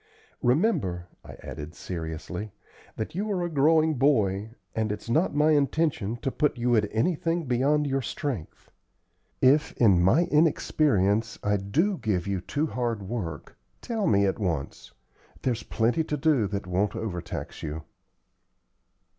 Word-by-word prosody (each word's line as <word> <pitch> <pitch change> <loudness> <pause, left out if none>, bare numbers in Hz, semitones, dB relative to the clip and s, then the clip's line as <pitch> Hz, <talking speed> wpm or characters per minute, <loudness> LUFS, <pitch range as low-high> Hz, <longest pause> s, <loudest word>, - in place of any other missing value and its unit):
Remember," 120 - +1 0.2
I - - -11
added, 75 +2 -7
seriously, 90 +4 -5 0.4
"that 110 - -4
you 205 +5 -2
are 180 -3 0
a 175 - -3
growing 155 +2 +4
boy, 110 -7 +2 0.2
and 110 -1 -1
it's 105 +2 -5
not 160 +4 +2
my 150 +1 +4
intention 140 -6 +1
to 135 - 0
put 150 -2 0
you 120 0 +2
at 105 -2 +2
anything 165 +7 0
beyond 140 +4 +2
your 135 -1 0
strength. 125 - -5 0.7
If, 140 +4 +4
in 100 -7 +5
my 115 - +4
inexperience, 125 - +2
I 105 0 +2
do 165 - 0
give 95 -5 -1
you 100 -2 -2
too 145 - -1
hard 120 -7 -2
work, 95 - -5 0.2
tell 225 -4 -2
me 100 -1 +4
at 95 - -1
once. 85 -9 -3 0.5
There's 120 -4 0
plenty 120 +11 0
to 150 - -2
do 135 -7 +2
that 100 -1 -4
won't 95 +3 0
overtax 90 -6 -5
you." 80 0 -5
120 Hz, 145 wpm, -27 LUFS, 100-150 Hz, 0.7 s, in